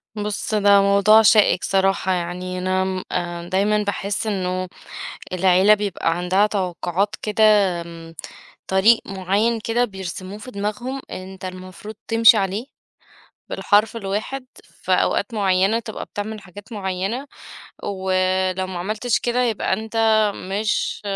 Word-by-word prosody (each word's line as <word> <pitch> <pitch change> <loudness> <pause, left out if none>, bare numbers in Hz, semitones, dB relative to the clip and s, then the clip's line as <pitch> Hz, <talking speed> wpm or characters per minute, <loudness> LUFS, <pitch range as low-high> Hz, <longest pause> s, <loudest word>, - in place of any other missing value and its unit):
بُصّ، 210 +1 -3
ده 200 -1 +5
موضوع 200 +2 +5
شائك 215 -3 +4
صراحة 195 -1 +1
يعني 180 +1 -3
أنا 185 0 -1
آمم 175 -1 -3
دايمًا 210 +3 +1
باحس 200 +1 -3
إنّه 185 -2 -2 0.7
العيلة 185 +3 +5
بيبقى 200 -5 -1
عندها 185 +4 +2
توقعات 190 0 -2
كده، 215 +1 0 0.4
آمم، 165 -1 -10 0.5
طريق 200 +5 +4
معيّن 200 +5 0
كده 230 +3 +1
بيرسموه 190 -1 -7
في 255 +4 -10
دماغهم 215 +6 -4
أنت 190 +1 -8
المفروض 185 +3 -8
تمشي 225 0 +6
عليه 200 +5 -1 0.8
بالحرف 210 +2 +2
الواحد، 220 +6 -4 0.2
في - - -6
أوقات 235 - +1
معيّنة 195 +1 +2
تبقى 220 -2 -6
بتعمل 215 +1 -6
حاجات 200 +3 -13
معيّنة، 195 +5 -3 0.6
ولو 185 -1 0
ما 185 -1 -6
عملتش 215 +6 -1
كده 245 +1 0
يبقى 225 -5 -1
أنت 220 +3 -3 0.4
مش 205 +4 -2
195 Hz, 120 wpm, -21 LUFS, 185-215 Hz, 0.8 s, تمشي